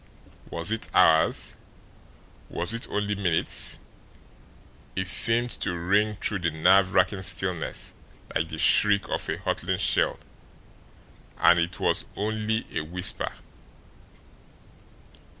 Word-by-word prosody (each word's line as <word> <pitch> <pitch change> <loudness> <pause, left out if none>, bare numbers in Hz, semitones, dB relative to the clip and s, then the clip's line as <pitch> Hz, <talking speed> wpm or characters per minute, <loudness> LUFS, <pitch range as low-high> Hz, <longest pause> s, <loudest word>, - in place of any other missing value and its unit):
Was 85 +5 -1
it 110 - -4
hours 80 0 +3 1.0
was 85 +6 -1
it 115 - -5
only 105 0 -2
minutes? 90 -5 0 1.2
It 95 - -2
seemed 115 +5 +5
to 90 -3 -2
ring 100 +5 0
through 105 - -2
the 85 -1 -1
nerve 90 +4 +2
racking 100 -2 +1
stillness 90 -3 -1 0.4
like 80 - -2
the 80 - -7
shriek 100 +4 +3
of - - -3
a - - -3
hurtling - - -3
shell - - +1 1.2
and 85 +1 +4
it 85 +1 -3
was - - 0
only 110 +2 -3
a - - -1
whisper. 90 +4 +1
95 Hz, 115 wpm, -25 LUFS, 85-105 Hz, 1.2 s, seemed